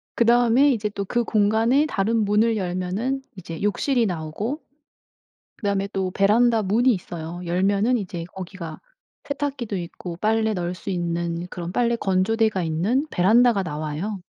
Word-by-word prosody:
그다음에 240 Hz, +4 st, +4 dB
이제 210 Hz, -3 st, -2 dB
또 200 Hz, -1 st, -4 dB
그 240 Hz, +5 st, 0 dB
공간에 225 Hz, +6 st, +3 dB
다른 220 Hz, -4 st, 0 dB
문을 215 Hz, +2 st, +2 dB
열면은 185 Hz, +8 st, -2 dB, 0.2 s
이제 165 Hz, -3 st, -7 dB
욕실이 235 Hz, +4 st, +1 dB
나오고 180 Hz, -, -3 dB, 1.0 s
그다음에 200 Hz, -2 st, -1 dB
또 190 Hz, -1 st, -1 dB
베란다 220 Hz, +4 st, +3 dB
문이 230 Hz, +6 st, +3 dB
있어요. 175 Hz, -3 st, -6 dB
열면은 200 Hz, +7 st, +2 dB
이제 180 Hz, -5 st, -5 dB
거기가 180 Hz, -3 st, -7 dB, 0.4 s
세탁기도 280 Hz, -7 st, -3 dB
있고 170 Hz, 0 st, -7 dB
빨래 220 Hz, +1 st, +1 dB
널 180 Hz, -1 st, -3 dB
수 185 Hz, -, -8 dB
있는 170 Hz, -1 st, -2 dB
그런 175 Hz, -1 st, -5 dB
빨래 235 Hz, +3 st, +1 dB
건조대가 205 Hz, +1 st, +1 dB
있는 190 Hz, -, 0 dB
베란다가 215 Hz, +3 st, +4 dB
나와요. 155 Hz, +5 st, -4 dB
200 Hz, 320 characters per minute, -23 LUFS, 180-230 Hz, 1.0 s, 그다음에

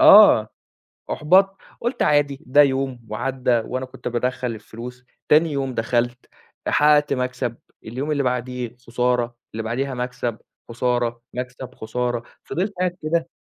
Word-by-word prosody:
آه، 215 Hz, -, +9 dB, 0.6 s
أُحبَطت، 195 Hz, +5 st, +4 dB, 0.2 s
قُلت 240 Hz, +3 st, -1 dB
عادي 145 Hz, -2 st, +3 dB
ده 145 Hz, +3 st, +7 dB
يوم 130 Hz, -4 st, 0 dB
وعدّى 125 Hz, +4 st, -1 dB, 0.2 s
وأنا 130 Hz, +1 st, -3 dB
كُنت 130 Hz, -, -6 dB
بادخّل 125 Hz, 0 st, -1 dB
الفلوس، 120 Hz, +3 st, -9 dB, 0.2 s
تاني 155 Hz, +1 st, +5 dB
يوم 135 Hz, -2 st, -2 dB
دخَلت، 120 Hz, +2 st, 0 dB, 0.4 s
حقّقت 150 Hz, 0 st, +4 dB
مكسب، 125 Hz, -2 st, -1 dB, 0.3 s
اليوم 130 Hz, +7 st, -4 dB
اللي 145 Hz, -1 st, +1 dB
بعدِيه 125 Hz, -1 st, -2 dB
خسارة، 125 Hz, 0 st, 0 dB, 0.2 s
اللي 110 Hz, +1 st, -3 dB
بعدِيها 130 Hz, +4 st, -2 dB
مكسب، 125 Hz, -2 st, -3 dB, 0.3 s
خسارة، 120 Hz, 0 st, 0 dB
مكسب، 125 Hz, 0 st, -6 dB
خسارة، 120 Hz, +1 st, -2 dB, 0.2 s
فضِلت 195 Hz, +4 st, -2 dB
قاعد 180 Hz, -1 st, 0 dB
كده 165 Hz, +2 st, 0 dB
125 Hz, 130 wpm, -23 LUFS, 120-145 Hz, 0.6 s, آه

